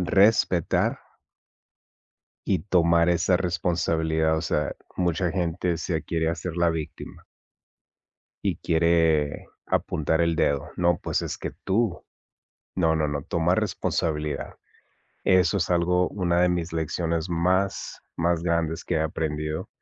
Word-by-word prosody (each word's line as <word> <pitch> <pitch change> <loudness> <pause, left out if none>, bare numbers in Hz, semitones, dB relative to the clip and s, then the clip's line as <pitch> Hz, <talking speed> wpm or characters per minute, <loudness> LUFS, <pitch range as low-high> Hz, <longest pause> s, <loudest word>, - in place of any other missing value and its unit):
Respetar. 95 -4 +3 1.5
Y 95 - +3
tomar 85 -1 +3
esa 90 +1 +3
responsabilidad. 80 -3 0
O - - -2
sea, 75 -3 -1 0.2
mucha 90 0 0
gente 90 -1 -1
se 80 -1 -2
quiere 80 -1 -1
hacer 85 +1 -4
la 85 -1 +3
víctima. 80 -2 -6 1.2
Y - - 0
quiere 80 -3 +2 0.2
apuntar 80 +2 0
el 85 -1 +2
dedo. 70 -3 0
No, 85 0 +3
pues, - - -1
es - - -4
que - - -5
tú. 100 -1 0 0.7
No, 80 -3 +2
no, 80 -1 +1
no, 70 -1 -3
toma 85 +3 +1
responsabilidad. 80 -7 -2 0.7
Eso 90 -4 +4
es - - -1
algo 90 +1 +2
una 90 -3 0
de 90 - +4
mis 85 -2 -1
lecciones 80 +1 -1
más, 90 +3 0 0.2
más 85 0 +1
grandes 85 -1 -1
que - - -2
he - - +1
aprendido. 75 -1 -2
85 Hz, 125 wpm, -25 LUFS, 80-90 Hz, 1.5 s, Eso